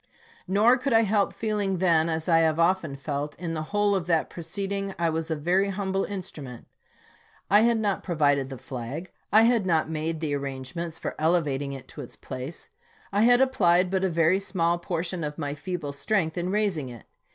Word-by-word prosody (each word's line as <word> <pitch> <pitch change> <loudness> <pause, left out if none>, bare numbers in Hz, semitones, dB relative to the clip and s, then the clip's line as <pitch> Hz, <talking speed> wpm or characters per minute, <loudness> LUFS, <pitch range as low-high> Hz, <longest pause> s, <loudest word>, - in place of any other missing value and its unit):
Nor 220 +7 +4
could 265 0 0
I 225 - +6
help 205 -1 +2
feeling 205 -4 -1
then, 170 -3 +3
as 160 -1 -2
I 165 -1 +5
often 165 -1 +1
have - - -13
felt, 145 +1 -3
in 165 -1 -4
the 155 - -2
whole 205 0 +2
of 185 -4 -1
that 165 -2 +1
proceeding 195 +3 -3
I 170 -1 +1
was 160 +1 -3
a 160 - 0
very 180 +6 +1
humble 195 0 -1
in 200 -2 -4
strument. 135 -9 -9 0.9
I 205 - +7
had 235 0 +3
not 205 -3 0
provided 145 -6 +1
the 135 - -7
flag; 130 +9 -6 0.2
I 220 +2 +7
had 230 -4 +3
not 160 -2 +1
made 160 +1 -2
the 155 -2 -2
arrangements 140 +4 -4
for - - -4
elevating 150 -4 +1
it 135 -2 -9
to - - -8
its - - -8
place; 130 +6 -8 0.5
I 205 - +3
had 245 +2 +6
ap 265 -1 +3
plied 180 -5 +3
but 190 -1 0
a 190 - +2
very 165 +2 +3
small 175 -3 0
portion 170 0 -3
of 150 0 -4
my 145 -3 -3
feeble 165 -1 -4
strength 160 +2 0
in 175 0 -2
raising 190 -9 0
it. 120 -3 -11
170 Hz, 200 wpm, -26 LUFS, 155-195 Hz, 0.9 s, I